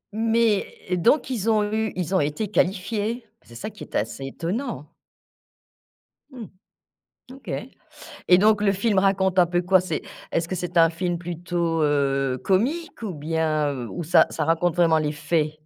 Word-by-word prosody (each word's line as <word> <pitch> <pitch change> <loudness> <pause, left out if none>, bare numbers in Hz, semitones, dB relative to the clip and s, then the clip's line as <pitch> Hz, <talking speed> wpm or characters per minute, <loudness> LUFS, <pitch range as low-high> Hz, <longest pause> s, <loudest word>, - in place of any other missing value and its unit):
Mais, 225 -2 +1
eh 180 - +1
donc 250 - +2
ils 225 -2 -1
ont 215 -1 +3
eu 220 0 0
ils 180 0 -3
ont 190 - +4
été 150 +9 -1
qualifiés? 210 +4 -1 0.2
C'est 120 - -16
ça 215 - -6
qui 205 - -11
est - - -11
assez 115 +5 -2
étonnant. 175 - -4 1.4
Mmh. 245 -4 -8 0.9
OK. 270 - -10 0.8
Et 180 - +8
donc 210 +1 +4
le 195 - +4
film 200 +1 0
raconte 190 -1 +1
un 175 - +6
peu 175 +1 0
quoi? 185 +1 +4
C'est 170 -4 -3 0.3
est-ce 165 0 0
que 185 - -3
c'est 180 0 -5
un 165 0 +6
film 175 +1 -2
plutôt 170 -1 -2
heu, 135 -3 +1
comique 245 - 0
ou 205 -4 -3
bien 155 -1 0
heu, 125 -3 -5
ou 175 - -5
ça 165 - +5
ça 155 - -2
raconte 165 +1 +1
vraiment 165 -2 +4
les 150 -1 0
faits? 155 0 0
175 Hz, 170 wpm, -24 LUFS, 160-210 Hz, 1.4 s, Et